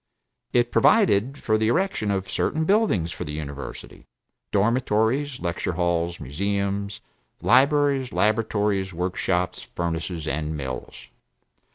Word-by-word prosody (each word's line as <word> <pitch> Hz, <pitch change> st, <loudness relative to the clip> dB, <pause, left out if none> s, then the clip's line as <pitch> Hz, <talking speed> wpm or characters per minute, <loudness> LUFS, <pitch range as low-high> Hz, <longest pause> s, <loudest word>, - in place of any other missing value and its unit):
It 120 Hz, 0 st, +2 dB
provided 135 Hz, -, +4 dB
for 110 Hz, -4 st, +1 dB
the 110 Hz, -, +2 dB
erection 120 Hz, -, +1 dB
of 95 Hz, -1 st, -1 dB
certain 160 Hz, +10 st, 0 dB
buildings 190 Hz, -, +2 dB
for 90 Hz, -, -5 dB
the 75 Hz, -3 st, -6 dB
University, 70 Hz, -2 st, -7 dB, 0.4 s
dormitories, 120 Hz, +5 st, +1 dB
lecture 85 Hz, -3 st, -2 dB
halls, 85 Hz, -1 st, 0 dB
museums, 100 Hz, +7 st, -2 dB, 0.4 s
libraries, 140 Hz, 0 st, +3 dB
laboratories, 105 Hz, -3 st, +1 dB
work 90 Hz, +2 st, -2 dB
shops, 90 Hz, -1 st, -1 dB
furnaces, 85 Hz, -1 st, -4 dB
and 75 Hz, 0 st, -2 dB
mills. 65 Hz, -3 st, -6 dB
100 Hz, 110 wpm, -24 LUFS, 85-120 Hz, 0.4 s, provided